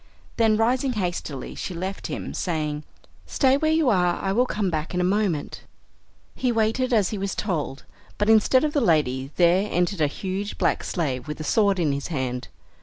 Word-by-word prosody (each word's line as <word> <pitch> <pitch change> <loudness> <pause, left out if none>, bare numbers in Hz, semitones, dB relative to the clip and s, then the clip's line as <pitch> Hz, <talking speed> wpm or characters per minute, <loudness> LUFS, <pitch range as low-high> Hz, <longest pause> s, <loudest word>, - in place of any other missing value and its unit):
Then 220 -2 +3
rising 250 +4 +1
hastily 175 - -4
she 185 - -5
left 190 +3 -4
him, - - -5
saying, 155 -4 -2 0.4
"Stay 265 -1 +3
where 310 +2 +1
you 315 -2 +2
are, 180 -3 +2
I 195 - -2
will 245 +5 +2
come 205 -5 -1
back 155 +2 -3
in - - +1
a - - +2
moment." 185 -5 0 0.7
He 250 - 0
waited 225 +3 +1
as 210 -6 +3
he 210 - -3
was 195 0 -2
told, 155 -9 -3 0.3
but 205 - 0
instead 220 +5 +5
of 300 -1 0
the 290 - +2
lady 135 - +1
there 180 +3 +4
entered 175 0 0
a 150 - +4
huge 195 +6 -4
black - - +1
slave 140 -7 -2
with 150 +1 -5
a - - -4
sword 200 +4 +2
in 160 -5 +1
his 140 0 -3
hand. 130 -6 -3
190 Hz, 190 wpm, -24 LUFS, 155-220 Hz, 0.7 s, instead